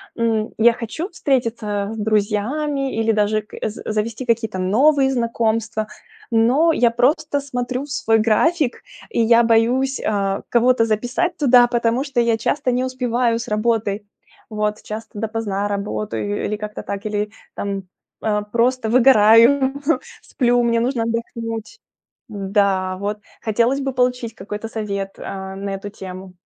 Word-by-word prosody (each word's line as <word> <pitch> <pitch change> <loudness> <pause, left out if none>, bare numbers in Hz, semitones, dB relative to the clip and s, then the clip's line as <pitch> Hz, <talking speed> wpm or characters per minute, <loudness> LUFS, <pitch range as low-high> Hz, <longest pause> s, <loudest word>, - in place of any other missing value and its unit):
м, 225 -2 0
я 235 +1 +6
хочу 245 - -5
встретиться 230 - -1
с 225 - -6
друзьями 220 +7 0
или 225 0 +2
даже 215 0 +1
к 210 - -14
з 210 - -9
завести 215 +3 -2
какие-то 225 -4 0
новые 265 +9 +3
знакомства, 230 -2 -1 0.4
но 250 +9 +4
я 240 -5 +3
просто 285 +5 +1
смотрю 250 -1 -3
в - - -16
свой 225 -5 +2
график, 245 +6 +1 0.3
и 430 - 0
я 230 +1 +5
боюсь, 240 +4 +2
э, 195 -2 -1
кого-то 240 -1 +3
записать 245 +11 -1
туда, 250 -4 +6
потому 240 +1 +1
что 275 -4 0
я 230 -1 +2
часто 255 +3 0
не 250 +1 0
успеваю 245 -2 0
с 235 - -6
работой. 215 -2 0 0.5
Вот 210 0 -2
часто 215 -1 -7
допоздна 210 -2 -2
работаю 205 0 -3
или 210 - -2
как-то 210 -1 -6
так, 200 0 -5
или 210 0 -2 0.2
там, 200 -1 -3 0.4
э, 210 -1 0
просто 240 0 +1
выгораю, 255 +2 +6 0.5
сплю, 245 -2 +1
мне 230 -1 +2
нужно 245 -1 0
отдохнуть. 230 - -4 0.5
Да 195 -2 0
вот. 205 +2 -3 0.3
Хотелось 235 +5 +2
бы 270 -1 -2
получить 250 -2 0
какой-то 210 +3 -6
совет, 200 -3 -4
э, 190 0 -6
на 200 +1 -4
эту 195 +1 -7
тему. 185 -2 -9
230 Hz, 145 wpm, -20 LUFS, 210-250 Hz, 0.5 s, я